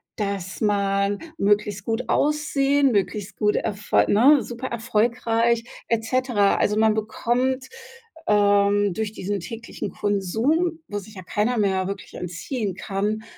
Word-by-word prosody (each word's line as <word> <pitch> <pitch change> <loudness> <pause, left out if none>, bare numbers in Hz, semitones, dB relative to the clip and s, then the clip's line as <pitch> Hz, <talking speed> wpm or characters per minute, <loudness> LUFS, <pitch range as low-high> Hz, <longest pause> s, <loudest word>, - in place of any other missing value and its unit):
dass 200 -3 -4
man 200 -1 +1 0.2
möglichst 205 -2 +1
gut 230 +2 -2
aussehen, 285 -2 +2
möglichst 205 -1 -1
gut 210 -1 +2
erfo 210 -1 -1
ne, 260 +7 +6
super 240 +2 -6
erfolgreich 230 0 +1 0.3
et 230 -1 +1
cetera. 235 -4 +2
Also, 210 - +1
man 220 0 +4
bekommt, 245 +4 -1 0.6
ähm, 205 -1 +3
durch 215 +2 -3
diesen 205 -1 -3
täglichen 230 +4 -6
Konsum, 235 - 0
wo 205 - -4
sich 210 +2 -13
ja 185 - -9
keiner 210 +8 0
mehr 190 -3 +1
wirklich 200 0 -7
entziehen 190 +5 -4
kann, 205 +3 -2
210 Hz, 130 wpm, -23 LUFS, 200-235 Hz, 0.6 s, ne